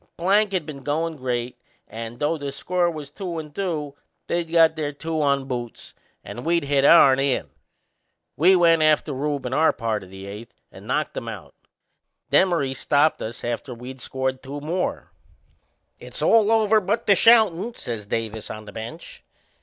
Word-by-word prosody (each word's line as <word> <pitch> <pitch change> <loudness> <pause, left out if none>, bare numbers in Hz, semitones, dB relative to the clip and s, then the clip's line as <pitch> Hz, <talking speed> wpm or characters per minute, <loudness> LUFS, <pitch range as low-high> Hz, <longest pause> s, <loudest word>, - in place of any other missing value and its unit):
Plank 200 +4 +2
had 185 -5 -1
been 145 -3 -8
goin' 160 +4 -2
great 125 -3 -3 0.3
and, 115 +1 -7
though 150 +4 0
the 145 -3 -5
score 175 +5 0
was 150 -4 -7
two 175 0 -5
and 150 -2 -7
two, 155 -6 -3 0.3
they'd 170 -1 -2
got 165 -1 +5
their 150 -2 -3
two 160 +2 -3
on 140 -2 +1
boots 120 -3 -6 0.3
and 120 - -8
we'd 170 0 +1
hit 140 -1 +1
ourn 140 -3 +7
in. 135 -1 0 0.8
We 185 +5 +5
went 165 -2 +4
after 155 -1 +2
Rube 140 0 -2
in 125 - -3
our 160 +3 +4
part 110 -3 -3
o' - - -12
the 95 +1 -10
eighth 105 +3 -10 0.2
and - - -13
knocked - - -1
him - - -5
out. - - -8 0.8
Demaree 165 -8 +3
stopped 145 +3 +1
us 115 +1 -6
after 120 +2 -4
we'd 125 +2 -10
scored 130 0 -3
two 140 +2 -7
more. 170 +5 -3 0.9
"It's - - -6
all 225 -1 +4
over 220 -1 +4
but 205 +4 -1
the 200 - +6
shoutin'!" 220 0 +4
says 110 -4 -6
Davis 110 0 -4
on 110 0 -7
the 105 - -10
bench. 110 +2 -9
145 Hz, 175 wpm, -23 LUFS, 125-170 Hz, 0.9 s, ourn